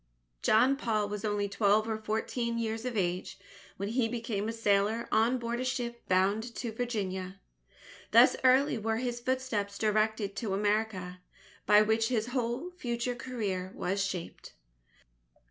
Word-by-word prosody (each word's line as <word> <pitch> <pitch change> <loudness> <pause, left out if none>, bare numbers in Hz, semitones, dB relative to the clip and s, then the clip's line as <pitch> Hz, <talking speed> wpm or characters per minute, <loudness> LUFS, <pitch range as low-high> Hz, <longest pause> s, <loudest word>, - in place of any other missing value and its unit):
John 255 +5 +4
Paul 215 -6 0
was 210 0 -5
only 205 -1 0
twelve 205 +2 +2
or 220 -1 -2
fourteen 230 +2 -2
years 225 0 -2
of 245 -3 -2
age, 180 -1 -1 0.4
when 200 +2 -3
he 235 0 +1
became 225 -3 -3
a - - 0
sailor 220 0 +1
on 230 +4 +3
board 235 0 -3
a - - -1
ship 240 -2 -3
bound 200 +6 +1
to 235 - -4
Virginia. 195 -5 -3 0.7
Thus - - +7
early 260 0 +4
were 220 +1 -1
his 240 0 -2
footsteps 240 -6 -2
directed 215 -1 0
to 205 -5 -1
America, 205 -3 -1 0.5
by 210 0 +7
which 220 +1 +2
his 235 -1 -1
whole 250 +7 -2
future 245 -7 -3
career 210 -7 -4
was 195 +2 -1
shaped. 185 -3 -5
220 Hz, 145 wpm, -30 LUFS, 205-240 Hz, 0.7 s, Thus